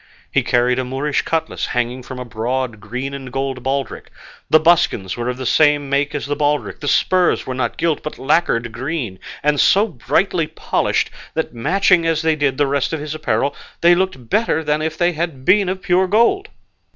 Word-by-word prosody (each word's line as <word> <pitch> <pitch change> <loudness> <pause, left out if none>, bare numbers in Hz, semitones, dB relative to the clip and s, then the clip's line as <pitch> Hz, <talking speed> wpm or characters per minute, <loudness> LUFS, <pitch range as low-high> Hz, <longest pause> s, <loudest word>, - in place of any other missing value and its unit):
He - - +3
carried 125 +1 +1
a - - 0
Moorish 135 +3 -1
cutlass 165 -1 -2
hanging 120 +1 -2
from 130 +1 -9
a 125 - -6
broad 120 0 -3
green 125 +6 -5
and 135 -2 -7
gold 135 0 -3
baldric; 135 0 -3 0.4
the 155 - +6
buskins 155 - +2
were 120 +1 -3
of 125 - -3
the 130 - -5
same 145 0 +3
make 145 +2 0
as 145 - -3
the 145 +1 -2
baldric; 145 0 -1
the 145 - -6
spurs 185 +4 +2
were 130 - -4
not 130 - -2
gilt, 165 -3 0
but 155 - -6
lacquered 130 -5 +1
green, 125 - -4 0.2
and 150 -1 +2
so 205 +3 +4
brightly 155 - 0
polished - - -1 0.2
that, 160 -4 -2
matching 170 +7 +2
as 160 -1 0
they 160 -1 +2
did 145 -3 0
the 145 - +3
rest 140 +2 -1
of 160 - -2
his 150 +1 -5
apparel, 140 -3 -1 0.3
they 170 +1 +6
looked 175 -9 -1
better 210 - +1
than 150 0 0
if 155 0 -3
they 175 0 +2
had 160 -5 -4
been 195 +2 +4
of 190 0 -4
pure 185 0 +2
gold. 235 - +2
145 Hz, 200 wpm, -19 LUFS, 130-165 Hz, 0.4 s, the